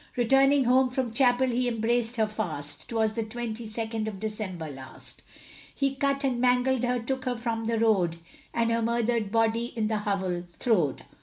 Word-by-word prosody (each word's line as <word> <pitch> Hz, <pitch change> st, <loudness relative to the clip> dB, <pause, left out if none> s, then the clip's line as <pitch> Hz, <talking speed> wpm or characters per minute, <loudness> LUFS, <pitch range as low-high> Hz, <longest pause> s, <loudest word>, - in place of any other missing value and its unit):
Returning 270 Hz, +3 st, +4 dB
home 255 Hz, +1 st, +4 dB
from 250 Hz, -2 st, -2 dB
chapel, 250 Hz, +1 st, +3 dB
he 250 Hz, 0 st, 0 dB
embraced 235 Hz, +1 st, 0 dB
her 220 Hz, -2 st, +2 dB
fast, 165 Hz, -9 st, -5 dB
'Twas 220 Hz, -2 st, +1 dB
the 230 Hz, -, -2 dB
twenty 225 Hz, 0 st, -5 dB
second 220 Hz, 0 st, -3 dB
of 205 Hz, -3 st, -5 dB
December 205 Hz, -6 st, -4 dB
last; 130 Hz, -2 st, -11 dB, 0.5 s
He 275 Hz, -1 st, +1 dB
cut 275 Hz, 0 st, 0 dB
and 250 Hz, -3 st, 0 dB
mangled 250 Hz, 0 st, +2 dB
her, 250 Hz, 0 st, +1 dB
took 260 Hz, +3 st, -3 dB
her 250 Hz, -1 st, -1 dB
from 230 Hz, -1 st, -2 dB
the 230 Hz, 0 st, 0 dB
road, 195 Hz, -7 st, +2 dB, 0.3 s
And 230 Hz, 0 st, +1 dB
her 230 Hz, 0 st, +1 dB
murdered 230 Hz, -2 st, 0 dB
body 225 Hz, +1 st, +2 dB
in 215 Hz, -2 st, 0 dB
the 215 Hz, -1 st, 0 dB
hovel 190 Hz, -4 st, -2 dB
throwed. 180 Hz, -, +1 dB
230 Hz, 175 wpm, -27 LUFS, 215-245 Hz, 0.5 s, Returning